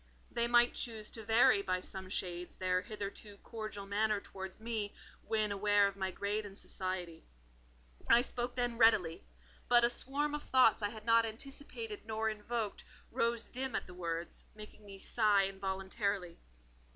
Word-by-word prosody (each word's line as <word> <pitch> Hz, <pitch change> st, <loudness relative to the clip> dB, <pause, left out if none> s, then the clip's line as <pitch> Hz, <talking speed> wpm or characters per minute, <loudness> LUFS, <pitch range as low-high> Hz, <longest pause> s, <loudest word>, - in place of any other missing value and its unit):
They 235 Hz, 0 st, +2 dB
might 240 Hz, 0 st, +5 dB
choose 220 Hz, -3 st, -3 dB
to 225 Hz, -, -6 dB
vary 220 Hz, -2 st, +5 dB
by 185 Hz, -2 st, 0 dB
some 190 Hz, 0 st, -5 dB
shades 180 Hz, -2 st, -3 dB
their 185 Hz, 0 st, +1 dB
hitherto 205 Hz, 0 st, -6 dB
cordial 215 Hz, -3 st, -6 dB
manner 210 Hz, +1 st, +1 dB
towards 190 Hz, -1 st, -8 dB
me, 220 Hz, -2 st, -3 dB, 0.3 s
when 215 Hz, -2 st, +1 dB
aware 205 Hz, 0 st, +4 dB
of 200 Hz, -, -5 dB
my 190 Hz, -1 st, -2 dB
grade 205 Hz, +3 st, -2 dB
in 200 Hz, -1 st, -9 dB
society. 180 Hz, -4 st, -4 dB, 0.9 s
I 235 Hz, -, +8 dB
spoke 245 Hz, -1 st, -1 dB
then 245 Hz, -2 st, -1 dB
readily: 185 Hz, -8 st, +4 dB, 0.5 s
but 240 Hz, -1 st, +6 dB
a 235 Hz, -, +4 dB
swarm 290 Hz, +4 st, 0 dB
of 295 Hz, -, -2 dB
thoughts 255 Hz, -6 st, +4 dB
I 205 Hz, -, 0 dB
had 215 Hz, 0 st, -10 dB
not 230 Hz, 0 st, +5 dB
anticipated 285 Hz, -, -5 dB
nor 220 Hz, 0 st, 0 dB
invoked, 215 Hz, 0 st, -3 dB, 0.3 s
rose 230 Hz, 0 st, +1 dB
dim 260 Hz, 0 st, -3 dB
at -, -, -1 dB
the 180 Hz, -, -11 dB
words, 170 Hz, -1 st, -4 dB
making 210 Hz, 0 st, -12 dB
me 195 Hz, -1 st, -9 dB
sigh 205 Hz, 0 st, +3 dB
involuntarily. 195 Hz, -1 st, -2 dB
210 Hz, 160 wpm, -34 LUFS, 195-235 Hz, 0.9 s, I